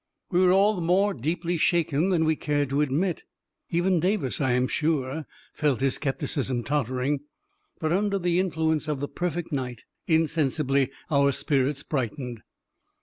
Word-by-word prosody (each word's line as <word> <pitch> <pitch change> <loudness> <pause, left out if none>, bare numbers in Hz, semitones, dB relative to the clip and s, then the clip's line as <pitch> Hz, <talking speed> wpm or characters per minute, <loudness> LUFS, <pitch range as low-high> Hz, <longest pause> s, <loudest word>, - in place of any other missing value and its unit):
We 180 - +3
were 180 -1 +5
all 195 0 +3
more 190 +4 +2
deeply 170 +6 -2
shaken 165 0 +2
than 170 -4 +2
we 160 0 +2
cared 145 -2 -1
to 140 +2 +2
admit 155 +5 0 0.3
— - - -59
even 175 +1 +2
Davis, 180 - 0
I 130 -3 +2
am 125 +1 +2
sure, 150 0 -1 0.3
felt 145 -5 +1
his 135 0 +2
skepticism 135 -3 -2
tottering! 135 0 0 0.3
— 405 +1 -43
but, 160 0 0
under 200 +1 +1
the 175 -1 +1
influ 160 -4 0
ence 155 -1 -1
of 150 -3 -1
the 145 - -2
perfect 175 0 -3
night, 125 -5 -3 0.2
insensibly 150 -4 +2 0.2
our 140 -1 +4
spirits 140 +1 0
brightened. 125 -3 -3
155 Hz, 160 wpm, -26 LUFS, 135-175 Hz, 0.3 s, were